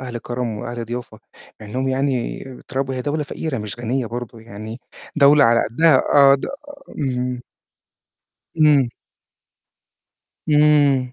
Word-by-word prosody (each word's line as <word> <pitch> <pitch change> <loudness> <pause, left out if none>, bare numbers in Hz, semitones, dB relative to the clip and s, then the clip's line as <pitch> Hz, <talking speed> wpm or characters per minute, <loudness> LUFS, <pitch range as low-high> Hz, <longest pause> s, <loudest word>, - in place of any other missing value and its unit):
أهل 125 -2 -6
كرم 120 +1 -4
وأهل 120 0 -5
ضيافة، 120 -2 -7 0.4
مع 105 - -10
إنّهم 130 +5 -2
يعني 130 -2 -1 0.2
تراب 135 0 -2
هي 130 -1 -3
دولة 150 +1 -2
فقيرة 145 -3 -4
مش 105 +2 -6
غنية 120 +1 -2
برضه، 120 -1 -7
يعني 110 +2 -9 0.4
دولة 145 0 +6
على 115 0 +4
قدّها 160 +3 +4 0.2
آه، 140 -1 +7
د 135 - -3 0.5
اهم. 125 -3 -2 1.2
إمم. 145 -5 +5 1.6
إمم. 145 -4 +3
130 Hz, 125 wpm, -20 LUFS, 120-140 Hz, 1.6 s, آه